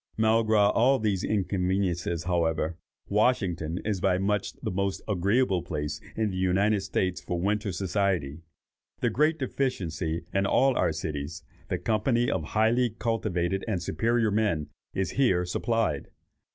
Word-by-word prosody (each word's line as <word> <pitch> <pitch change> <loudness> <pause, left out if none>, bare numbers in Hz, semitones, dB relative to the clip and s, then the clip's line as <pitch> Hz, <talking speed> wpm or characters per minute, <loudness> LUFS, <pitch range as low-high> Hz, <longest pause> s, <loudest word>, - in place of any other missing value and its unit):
Malgré 110 -2 +4
all 130 +4 +4
these 105 -5 0
inconveniences, 90 -4 0
however, 85 -2 0 0.3
Washington 95 -7 +1
is 105 -4 -1
by 90 -2 +3
much 100 +1 -1
the - - -5
most 100 +1 -2
agreeable 100 0 +2
place 75 -3 -4
in 110 -2 0
the 95 - -4
United 95 +3 +2
States 95 -2 -1
for 90 - -3
winter 105 +2 0
society. 90 -5 -1 0.6
The - - +2
great 155 +4 +2
deficiency 85 - -2
in 95 0 +2
all 135 +4 +3
our - - +2
cities, 75 +2 -5 0.3
the - - 0
company 115 +2 +1
of 95 - -1
highly 115 +8 +2
cultivated 95 -5 -1
and 105 -5 0
superior 115 +7 +1
men, 100 -8 0 0.3
is 95 - -1
here 95 -10 +2
supplied. 100 -4 -1
95 Hz, 140 wpm, -27 LUFS, 85-110 Hz, 0.6 s, Malgré